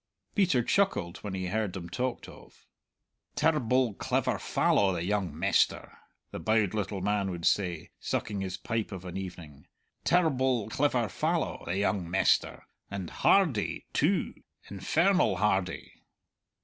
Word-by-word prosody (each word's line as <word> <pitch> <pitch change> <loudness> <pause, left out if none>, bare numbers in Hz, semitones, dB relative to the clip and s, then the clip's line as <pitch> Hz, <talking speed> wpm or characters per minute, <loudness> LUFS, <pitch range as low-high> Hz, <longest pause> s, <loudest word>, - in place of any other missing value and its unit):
Peter 180 - +3
chuckled 105 - +1
when 100 -2 -6
he 95 -1 -3
heard 105 0 -1
them 90 -3 -6
talked 125 +8 -3
of. - - -16 0.7
"Terr'ble 130 -6 +2
clever - - 0
fallow, 100 -1 +2
the 85 -1 -2
young 95 -5 -1
mester!" - - +1 0.4
the - - -5
bowed 110 -3 +1
little 100 -2 -2
man 100 0 0
would 85 -2 -5
say, 90 -5 0
sucking 100 -2 -2
his 95 -1 -4
pipe 115 -2 -3
of 95 -2 -7
an 90 - -7
evening, 85 -7 -8 0.4
"terr'ble 130 - +2
clever 130 -4 +1
fallow, 95 - -1
the 90 - -2
young 100 -3 0
mester; 95 +2 +2 0.3
and 100 -3 -5
hardy, 160 - +2
too - - +1 0.4
infernal 170 - +2
hardy!" 95 -3 -1
105 Hz, 135 wpm, -29 LUFS, 95-125 Hz, 0.7 s, Peter